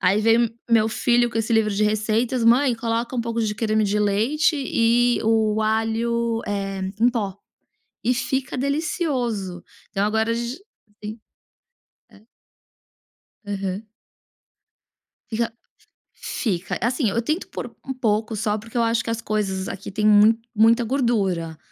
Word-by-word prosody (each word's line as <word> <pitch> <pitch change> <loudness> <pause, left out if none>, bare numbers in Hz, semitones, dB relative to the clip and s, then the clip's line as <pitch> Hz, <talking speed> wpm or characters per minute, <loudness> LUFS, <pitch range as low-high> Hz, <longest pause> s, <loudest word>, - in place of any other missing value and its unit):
Aí 195 +3 +3
vem 225 +1 +4
me 230 -1 -1
meu 220 -1 +4
filho 240 +1 +2
com - - -6
esse 225 +1 -1
livro 220 -1 +3
de 210 - +1
receitas: 220 +3 0
"Mãe, 245 +2 +5
coloca 230 +2 -2
um - - +1
pouco 230 0 -2
de 210 -1 -1
creme 215 0 +1
de 205 +1 0
leite 225 - +2
e 240 -2 +2
o 220 -1 +2
alho, 225 +1 0
eh, 195 -1 -3 0.2
em 235 - +6
pó", 205 -6 -3 0.7
e 250 - +2
fica 260 +2 -2
delicioso. 255 - -2 0.3
Então 195 +1 0
agora 220 +2 +1
a - - +2
gen 235 +3 -3 0.5
sim 215 +2 -6 0.9
é. 200 - -19 1.2
Aham. 200 +1 -4 1.4
Fic 230 +1 0 0.7
fica, 185 -7 -3
assim, 245 +1 +1
eu 230 - 0
tento 310 +9 -2
pôr - - -7
um 265 - -2
pouco 220 -3 -1
só, 210 0 0
porque 225 +3 -10
eu 235 - +3
acho 230 0 +1
que 230 - -4
as 230 0 -2
coisas 195 -4 -2
aqui 195 - -6
tem 210 +2 0
mu 215 +2 +6 0.2
muita 230 +2 +4
gordura, 200 - 0
225 Hz, 150 wpm, -23 LUFS, 210-235 Hz, 1.4 s, em